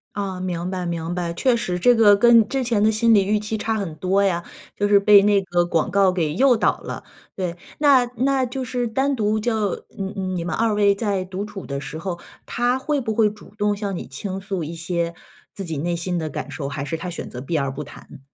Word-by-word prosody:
啊， 195 -3 -3
明 180 -1 -3
白 185 -1 -3
明 170 0 -3
白。 175 -1 -2
确 240 +8 +2
实 180 -6 -2
这 245 +7 +5
个 210 -3 +6
跟 230 0 +6
之 270 -1 -1
前 230 -4 +1
的 215 - +5
心 225 +1 +3
理 200 -2 +5
预 210 +2 +1
期 210 +1 -3
差 225 +1 -1
很 195 -7 -4
多 190 +4 +1
呀， 175 -3 +1 0.3
就 205 - +1
是 205 -1 +6
被 200 0 +7
那 205 0 +4
个 175 -2 0
广 170 +1 0
告 195 0 +4
给 165 -5 -1
诱 255 +4 +4
导 - - +1
了， - - -7 0.3
对。 180 -3 -3 0.2
那 280 -4 +5
那 265 +2 +2
就 255 +1 -4
是 245 -1 -2
单 270 +5 0
独 215 -3 0
就 215 -3 -1
你 195 - -5 0.3
你 170 -2 -3
们 175 - -3
2 225 -1 +1
位 205 -1 +4
在 200 -3 -1
独 185 +2 -5
处 205 -2 -8
的 140 0 -4
时 135 +3 -7
候， 175 +1 -4 0.3
他 245 +1 0
会 285 +2 -1
不 220 -3 -2
会 215 -1 +3
主 205 0 -15
动 205 0 +1
向 200 -2 -3
你 - - -6
倾 185 +8 -5
诉 190 -3 -4
一 165 +3 -6
些 170 0 -2 0.4
自 195 - -5
己 160 -4 -4
内 170 +4 -1
心 175 +1 -2
的 160 - -3
感 145 - -6
受， 140 -1 -5
还 140 -1 -4
是 165 +3 -3
他 170 +3 -6
选 170 - -6
择 125 - -7
避 155 +5 -2
而 140 -2 0
不 150 +3 -6
谈？ 145 - -13
200 Hz, 255 characters per minute, -22 LUFS, 170-220 Hz, 0.4 s, 被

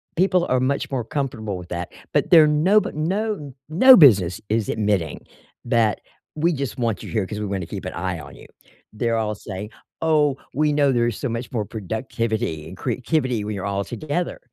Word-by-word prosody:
people 180 0 +2
are 130 0 +3
much 140 +2 0
more 130 -3 -1
comfortable 110 -7 -3
with 90 - -9
that, 85 0 -4 0.2
but - - +1
there 165 -3 +9
are - - +4
no 160 +8 +4
bu - - -4
no 180 -2 -2 0.2
no 255 +11 +8
business 100 - +6
is 110 -1 0
admitting 100 -7 0 0.5
that 115 -3 +2 0.4
"we 170 +3 +1
just 140 -3 -4
want 115 -3 -1
you - - -8
here 110 -4 0
'cause 105 +1 -5
we're 105 - -2
gonna 95 - -3
keep 95 +2 -7
an 90 - -5
eye 85 -1 -3
on 70 -2 -11
you." - - -14 0.5
They're 115 +1 0
all 105 -1 -1
saying, 100 +1 -7 0.3
"Oh, 150 -4 +2 0.2
we 150 +2 +2
know 145 -2 +3
there's 120 -2 +1
so - - -2
much 115 +1 -4
more 110 -4 -2
productivity 110 -5 -3
and 95 - -11
creativity 125 -1 -1
when 105 - -4
you're 95 - -5
all 100 0 -1
together," 155 +8 -3
120 Hz, 200 wpm, -22 LUFS, 105-150 Hz, 0.5 s, there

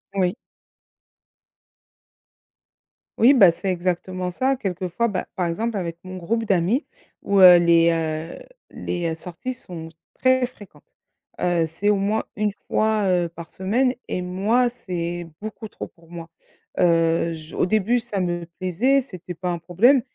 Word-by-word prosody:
Oui. 185 -1 +1 2.8
Oui, 250 +5 +6
bah, 195 -10 +7
c'est 190 +3 -4
exactement 180 +1 -2
ça 265 +8 +1
quelquefois, 190 +1 -2
ben, 185 -3 -3
par 180 -3 0
exemple, 220 +7 -2
avec 170 -3 -4
mon 185 0 -8
groupe 225 +6 -1
d'amis 200 - +1 0.4
où, 200 -1 +1
heu, 180 -1 +10
les 170 -1 +4
heu, 160 -1 -3 0.3
les 170 -2 -3
sorties 180 +10 -6
sont 170 -9 -9 0.3
très 260 -1 +3
fréquentes. 210 -5 -16 0.6
Heu, 175 -2 +2
c'est 180 +6 -1
au 210 - +3
moins 205 +3 0
une 210 -1 0
fois, 215 -2 +1
heu, 175 -2 +1
par 170 0 -10
semaine 245 +7 +1
et 180 - -2
moi, 210 +7 +1
c'est 175 -6 -5
beaucoup 215 0 -7
trop - - -8
pour 165 -1 -23
moi. 170 -1 -9 0.5
Heu, 165 -1 +3
je 155 0 -10
au - - +2
début, 215 +5 +2
ça 215 -5 -3
me 175 -1 -2
plaisait, 235 +10 +2
c'était 180 -7 -9
pas 180 +1 -3
un 170 - -3
problème, 225 - +4
185 Hz, 150 wpm, -23 LUFS, 170-220 Hz, 2.8 s, heu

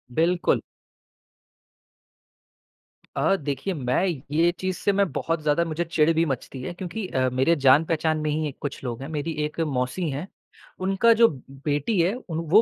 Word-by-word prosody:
बिल्कुल। 175 +2 +2 2.6
अ, 195 - +3
देखिए 150 +4 -3
मैं 130 +4 0 0.3
ये 165 +3 +3
चीज़ 185 -1 -2
से 200 - +1
मैं 195 -5 +2
बहुत 165 +3 -2
ज़्यादा 150 +3 +2
मुझे 165 +1 -2
चिढ़ 165 -1 +2
भी 165 +1 +2
मचती 135 -1 -4
है 175 - -5
क्योंकि 185 +3 -5
अ, 130 -4 +1
मेरे 130 +7 +2
जान-पहचान 155 +3 +4
में 155 - -1
ही 155 0 0
एक 140 - -8
कुछ 140 -1 -5
लोग 120 0 -4
हैं, 135 - -6
मेरी 155 +1 -3
एक 150 +2 -6
मौसी 145 +3 -1
है, 145 +7 -4 0.5
उनका 195 +5 +4
जो 230 +1 +6
ब 135 - -9 0.2
बेटी 150 +7 0
है, 180 +5 +2
उन 165 -10 -5
वो 210 +6 +7
160 Hz, 170 wpm, -25 LUFS, 145-180 Hz, 2.6 s, वो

